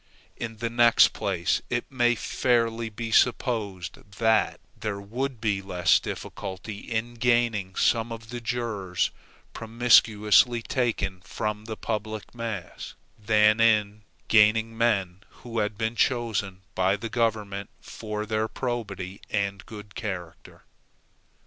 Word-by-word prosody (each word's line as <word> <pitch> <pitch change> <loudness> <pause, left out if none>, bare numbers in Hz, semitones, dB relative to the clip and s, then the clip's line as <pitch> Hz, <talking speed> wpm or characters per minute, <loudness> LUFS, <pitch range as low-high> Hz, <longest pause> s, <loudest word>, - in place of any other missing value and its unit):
In 115 -1 -6
the 115 +1 -2
next 120 -1 +6
place, 90 -4 -1
it 120 0 -1
may 120 -2 +3
fairly 115 -1 0
be 115 +1 -6
supposed, 110 -7 +1 0.2
that 110 -1 +2 0.2
there 100 -2 -4
would 120 +5 -4
be 105 -3 0
less 90 -3 +3
difficulty 100 +3 -6
in 115 +2 -3
gaining 120 -5 +1
some 115 0 +2
of 115 0 -8
the 120 0 -5
jurors 110 -6 -1 0.4
promiscuously 115 0 +4
taken 105 -8 -1
from 105 +2 -4
the 110 -1 -6
public 110 -1 -4
mass, 115 -6 -6 0.2
than 105 +1 +4
in 105 -2 +3 0.3
gaining 110 +1 +4
men 100 -6 +1 0.3
who 115 -1 -3
had 105 -1 -1
been 110 +1 -1
chosen 105 -7 0
by 95 +1 +2
the 105 +3 -5
government 105 -4 -1
for 105 -1 -6
their 110 0 0
probity 100 -7 -4
and 100 -2 -1
good 105 -2 -10
character. 90 -6 -7
110 Hz, 125 wpm, -26 LUFS, 100-115 Hz, 0.4 s, next